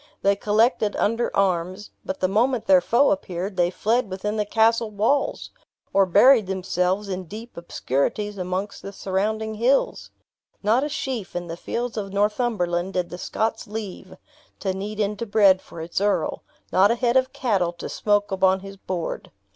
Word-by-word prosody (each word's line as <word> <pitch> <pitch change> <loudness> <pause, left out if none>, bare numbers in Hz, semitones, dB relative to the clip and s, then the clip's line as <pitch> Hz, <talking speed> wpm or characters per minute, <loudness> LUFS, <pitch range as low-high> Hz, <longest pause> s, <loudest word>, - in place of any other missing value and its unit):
They 200 0 +4
collected 215 +1 +2
under 230 +3 +1
arms; 185 +1 0
but 190 - -5
the 185 - +3
moment 230 +5 +1
their 185 -2 +6
foe 240 +9 +3
appeared, 190 0 -3
they 175 -1 +2
fled 225 +5 0
within 200 +3 -3
the 210 -1 -1
castle 225 +1 +3
walls, 220 +7 0 0.4
or 195 -1 +4
buried 235 +3 +6
themselves 190 +1 -1
in 185 -1 -4
deep 220 +7 -10
obscurities 170 +5 -2
amongst 185 +3 -3
the 200 - -8
surrounding 215 +4 -2
hills. 240 +6 +1 0.5
Not 225 +6 +3
a 295 - -2
sheaf 250 -10 -4
in 175 0 -3
the 165 -1 -6
fields 235 +7 -4
of 195 -2 -4
Northumberland 200 -4 0
did 180 -1 -2
the 175 - -7
Scots 220 +3 -2
leave, 210 -2 -7 0.4
to 190 -2 -1
knead 205 +3 -5
into 210 +2 -1
bread 200 -3 +5
for 165 - -10
its 170 +3 -3
earl; 205 0 0 0.3
not 195 +2 +5
a 235 - +2
head 240 0 +1
of 260 0 +3
cattle 200 -11 0
to 170 - -7
smoke 205 -1 0
upon 190 0 +2
his 195 0 -10
board. 185 -3 -4
205 Hz, 170 wpm, -23 LUFS, 185-220 Hz, 0.5 s, their